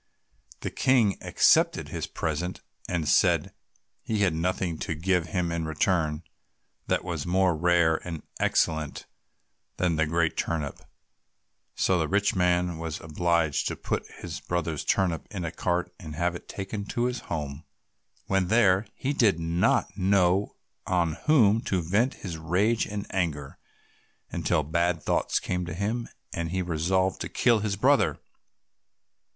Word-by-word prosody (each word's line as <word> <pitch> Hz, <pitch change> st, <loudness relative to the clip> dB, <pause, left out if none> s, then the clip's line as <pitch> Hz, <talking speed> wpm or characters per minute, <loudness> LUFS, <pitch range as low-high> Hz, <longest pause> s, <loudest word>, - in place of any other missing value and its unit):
The -, -, -3 dB
King 120 Hz, -7 st, +3 dB
accepted -, -, +3 dB
his -, -, -4 dB
present, 85 Hz, +3 st, -3 dB, 0.3 s
and 85 Hz, -4 st, -1 dB
said 70 Hz, -, +3 dB, 0.5 s
he 110 Hz, -2 st, -2 dB
had 95 Hz, -5 st, +3 dB
nothing 85 Hz, 0 st, -1 dB
to 80 Hz, -, -3 dB
give 90 Hz, +1 st, +1 dB
him 85 Hz, +1 st, -1 dB
in 85 Hz, -1 st, -2 dB
return 80 Hz, 0 st, 0 dB, 0.6 s
that -, -, +1 dB
was 85 Hz, -3 st, -4 dB
more 90 Hz, -1 st, +3 dB
rare 85 Hz, 0 st, +3 dB
and 80 Hz, -4 st, -7 dB, 0.2 s
excellent 80 Hz, -2 st, 0 dB, 0.7 s
than 85 Hz, -3 st, +1 dB
the 80 Hz, -1 st, +2 dB
great 85 Hz, 0 st, +1 dB
turnip. 75 Hz, -4 st, -2 dB, 1.0 s
So 90 Hz, -2 st, +2 dB
the 80 Hz, -, 0 dB
rich 100 Hz, +3 st, +2 dB
man 90 Hz, -2 st, +1 dB
was 80 Hz, -2 st, -4 dB
obliged 80 Hz, -1 st, 0 dB
to -, -, -2 dB
put -, -, -2 dB
his -, -, -7 dB
brother's 85 Hz, -3 st, -2 dB
turnip 90 Hz, -4 st, 0 dB
in 95 Hz, -5 st, -4 dB
a 80 Hz, -, -3 dB
cart 90 Hz, +1 st, -1 dB
and 75 Hz, -2 st, -8 dB
have 85 Hz, +2 st, 0 dB
it 85 Hz, -, -10 dB
taken 100 Hz, +1 st, -5 dB
to 120 Hz, +4 st, -1 dB
his 125 Hz, 0 st, -1 dB
home. 75 Hz, -2 st, -4 dB, 0.6 s
When 95 Hz, -2 st, +1 dB
there 100 Hz, -1 st, +4 dB
he 140 Hz, +2 st, -2 dB
did 105 Hz, -, +3 dB
not 85 Hz, +1 st, +1 dB
know 95 Hz, 0 st, +2 dB, 0.3 s
on 85 Hz, -3 st, +1 dB
whom 115 Hz, -8 st, +5 dB
to 95 Hz, -, +1 dB
vent 100 Hz, +10 st, +1 dB
his 85 Hz, -5 st, -6 dB
rage 100 Hz, +8 st, +1 dB
and 105 Hz, -1 st, -4 dB
anger, 75 Hz, -7 st, -2 dB, 0.7 s
until 75 Hz, -, +1 dB
bad 85 Hz, +2 st, 0 dB
thoughts -, -, +1 dB
came 90 Hz, 0 st, -2 dB
to 85 Hz, -, -5 dB
him, 110 Hz, +5 st, -2 dB, 0.2 s
and 85 Hz, -1 st, -3 dB
he 95 Hz, +1 st, -1 dB
resolved 90 Hz, +3 st, 0 dB
to -, -, -3 dB
kill 120 Hz, -3 st, +3 dB
his 105 Hz, -1 st, -1 dB
brother. 100 Hz, -, +3 dB
90 Hz, 150 wpm, -27 LUFS, 80-95 Hz, 1.0 s, whom